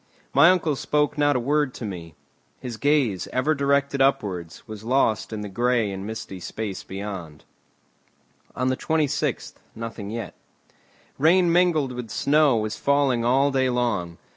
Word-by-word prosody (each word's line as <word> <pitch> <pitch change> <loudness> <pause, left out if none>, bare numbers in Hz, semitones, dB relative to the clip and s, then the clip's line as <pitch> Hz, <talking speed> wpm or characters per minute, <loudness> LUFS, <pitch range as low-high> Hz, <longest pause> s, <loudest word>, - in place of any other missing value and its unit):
My 170 - +7
uncle 165 -5 +2
spoke 150 +1 0
not 145 -1 +2
a - - +2
word 145 +1 0
to 115 - -6
me. 85 -6 -7 0.4
His 125 -2 -6
gaze, 140 -10 +1
ever 130 +5 +1
directed 140 -1 +1
upwards, 95 -12 -1
was 110 -1 -8
lost 115 -3 +1
in 110 -1 -4
the 105 - -5
grey 120 +1 +1
and 95 +1 -6
misty 110 -4 -6
space 100 +2 -5
beyond. 95 -6 -7 1.1
On 130 - 0
the 130 - 0
26th 155 -3 -1 0.2
nothing 115 -3 -6
yet. 110 -4 -5 0.9
Rain 170 +4 +4
mingled 170 -6 +2
with 125 -2 -6
snow 145 +1 +3
was 110 -1 -2
falling 140 -4 +2
all 135 +4 +3
day 130 -1 +1
long. 110 -9 -1
125 Hz, 150 wpm, -24 LUFS, 105-145 Hz, 1.1 s, My